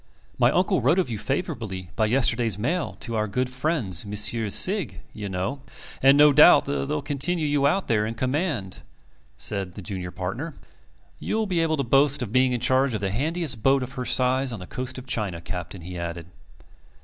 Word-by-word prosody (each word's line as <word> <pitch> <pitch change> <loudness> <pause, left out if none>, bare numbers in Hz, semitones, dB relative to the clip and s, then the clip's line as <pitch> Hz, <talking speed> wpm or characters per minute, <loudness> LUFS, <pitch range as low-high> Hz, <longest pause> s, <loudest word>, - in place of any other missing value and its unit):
"My - - +5
uncle - - +1
wrote 140 +9 +3
of 180 -10 0
you 110 - -4
favourably 110 - -4
by 110 - +1
yesterday's 115 -3 +1
mail 160 +11 -2
to 115 -2 -4
our 110 -1 0
good 125 +5 -2
friends 125 - 0
Messrs. 105 +1 +1
Sigg, 180 - +1
you 105 -2 -6
know 95 +10 -3 0.4
and 135 +1 +6 0.2
doubtless 145 -2 +5
they'll 150 0 -2
continue 150 +4 -1
you 145 -1 +2
out 190 +6 0
there 105 -2 +1
in 115 - -5
command," 130 - -2 0.6
said 95 -3 -1
the - - -7
junior 95 -4 -5
partner. 105 - -5 0.6
"You'll 220 0 -1
be 180 -4 -1
able 160 -1 +1
to 140 - 0
boast 140 +2 +3
of 105 - -6
being 130 +1 +3
in 125 - -1
charge 130 0 +1
of 105 - -4
the 95 -1 -1
handiest 150 - -1
boat 135 +2 +3
of 125 - -7
her 130 -2 -5
size 130 +1 +2
on 115 - -6
the 90 - -8
coast 125 +7 -5
of 130 - -8
China, 105 -9 -2
Captain," 90 +1 -7
he 90 +1 -7
added. 85 -1 -5
125 Hz, 190 wpm, -24 LUFS, 100-145 Hz, 0.6 s, and